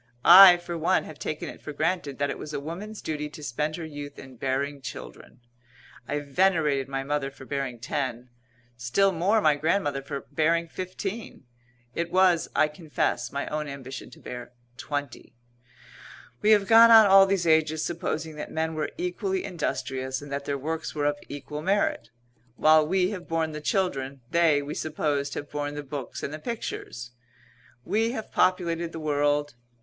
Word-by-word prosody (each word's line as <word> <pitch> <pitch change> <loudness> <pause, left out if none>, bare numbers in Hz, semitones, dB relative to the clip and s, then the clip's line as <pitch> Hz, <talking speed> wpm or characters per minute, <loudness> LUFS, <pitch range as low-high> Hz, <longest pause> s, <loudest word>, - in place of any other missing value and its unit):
I, 180 0 +11
for 175 0 -6
one, 175 +4 +2
have 155 - -11
taken 155 - -4
it - - -9
for 150 - -7
granted 155 -2 -1
that 140 0 0
it - - -6
was 150 0 -6
a - - -1
woman's 185 +9 -7
duty 150 -1 -3
to 150 0 -11
spend 150 +4 -2
her 170 - -6
youth 145 -2 -8
in 135 -1 -11
bearing 135 +3 -2
children. 125 -1 -10 0.7
I 145 +1 -2
venerated 150 -3 +1
my 135 0 -3
mother 145 0 -1
for 135 -1 -13
bearing 135 -3 -3
ten; 125 0 -3 0.5
still 120 +12 +2
more 190 +6 +2
my 155 -5 +5
grandmother 145 -2 0
for 140 0 -5
bearing 165 +2 +1
fifteen; 185 +1 -6 0.5
it 170 0 -3
was, 185 -3 +3
I 155 - +4
confess, 150 0 -2
my 140 0 -3
own 150 0 -3
ambition 135 -1 -8
to - - -15
bear 125 0 -8 0.2
twenty. 145 -3 -5 1.1
We 210 - +3
have 210 -2 +5
gone 230 +1 +8
on 225 -1 +9
all 195 0 +7
these 195 -3 0
ages 160 -1 +2
supposing 160 -2 -3
that 150 - -6
men 160 0 -1
were 155 -1 -2
equally 190 +1 -2
industrious, 130 -7 -3
and 145 -1 -10
that 140 0 -3
their 140 - -1
works 160 +4 -4
were 145 -1 -1
of 145 0 0
equal 145 +1 -6
merit. 190 - 0 0.5
While 155 +1 +5
we 185 +2 +1
have 185 -4 -7
borne 165 -1 0
the 150 0 -6
children, 140 -7 -1
they, 160 -4 +3
we 145 +1 -5
supposed, 150 -2 -2
have 145 - -6
borne 145 0 -3
the 145 - -5
books 140 -1 -6
and 145 - -4
the 155 - -6
pictures. 140 - -6 0.7
We 225 +2 +1
have 220 -3 -6
populated 170 -2 +1
the 160 - -5
world. 145 -1 0
155 Hz, 175 wpm, -26 LUFS, 140-175 Hz, 1.1 s, I